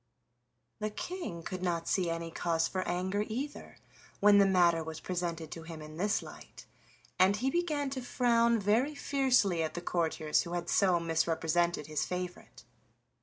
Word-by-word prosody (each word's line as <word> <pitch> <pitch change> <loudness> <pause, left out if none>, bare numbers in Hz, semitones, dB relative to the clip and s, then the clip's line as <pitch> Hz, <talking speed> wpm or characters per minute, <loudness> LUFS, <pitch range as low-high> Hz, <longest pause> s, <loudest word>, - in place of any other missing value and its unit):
The 215 0 -1
King 210 - -6
could 185 +1 -5
not 170 -2 -1
see 180 -3 +1
any 165 0 -3
cause 165 -1 0
for 185 - -2
anger 185 +4 -1
either 265 +7 -5 0.4
when 205 0 +6
the 200 - +6
matter 175 -3 +4
was 160 0 -6
presented 170 -3 -4
to 165 - -7
him 165 -1 -8
in 155 0 -10
this 205 +4 0
light, - - -12 0.5
and 190 +2 +5
he 255 +6 0
began 300 -5 -1
to 265 -1 -3
frown 235 -2 +2
very 230 +9 +1
fiercely 255 - +2
at 160 - -2
the - - -2
courtiers 160 -3 0
who 170 - -6
had 175 0 -3
so 185 -4 +4
misrepresented 165 0 0
his 155 0 -2
favorite. 180 0 -6
180 Hz, 165 wpm, -31 LUFS, 165-215 Hz, 0.5 s, when